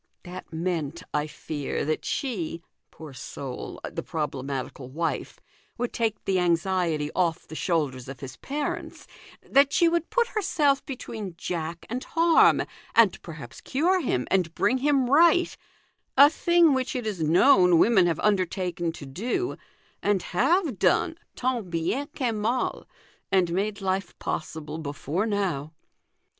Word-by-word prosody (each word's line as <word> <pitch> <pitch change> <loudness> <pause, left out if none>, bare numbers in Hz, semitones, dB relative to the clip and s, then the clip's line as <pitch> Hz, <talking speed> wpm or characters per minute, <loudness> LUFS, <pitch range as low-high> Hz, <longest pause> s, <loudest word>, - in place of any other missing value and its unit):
That 180 0 -9
meant, 165 -1 -3
I 150 +1 0
fear, 150 -2 -4
that 155 +1 -1
she 175 - -3 0.3
(poor 155 -3 -11
soul! 130 0 -7
the - - -5
problematical 135 -3 -4
wife) 160 +4 -3 0.4
would 245 0 -2
take 225 -2 -1
the 190 -1 +2
anxiety 170 -3 +1
off 170 -3 0
the - - -10
shoulders 145 -7 -1
of 135 - -8
his 135 -1 -8
parents, 300 +5 -4 0.4
that 280 +1 +5
she 340 - +4
would 335 0 0
put 485 -1 +2
herself 290 -9 +1
between 220 - -6
Jack 170 -1 -4
and 250 +3 -4
harm, 330 0 +4 0.3
and - - +5
perhaps - - -10
cure 355 +7 +1
him, 125 - -1
and 180 -4 +1
bring 260 - +2
him 275 -2 +2
right 335 +6 +4 0.6
a 285 +2 +9
thing 340 -2 +4
which 260 0 -1
it 245 -3 -2
is 205 -6 -3
known 180 - +5
women 190 -1 +5
have 165 -3 0
undertaken 180 -4 0
to 145 - -9
do, 240 - -2 0.5
and 205 -3 +1
have 310 - +1
done 325 - +2 0.2
tant 245 -6 -1
bien 170 +12 -1
que 250 -3 0
mal, 220 +4 -1 0.4
arid 185 -3 +3
made 200 +3 -1
life 190 -1 -2
possible, 155 0 -4
before 155 +6 -2
now. 185 -9 -1
185 Hz, 140 wpm, -26 LUFS, 160-260 Hz, 0.6 s, a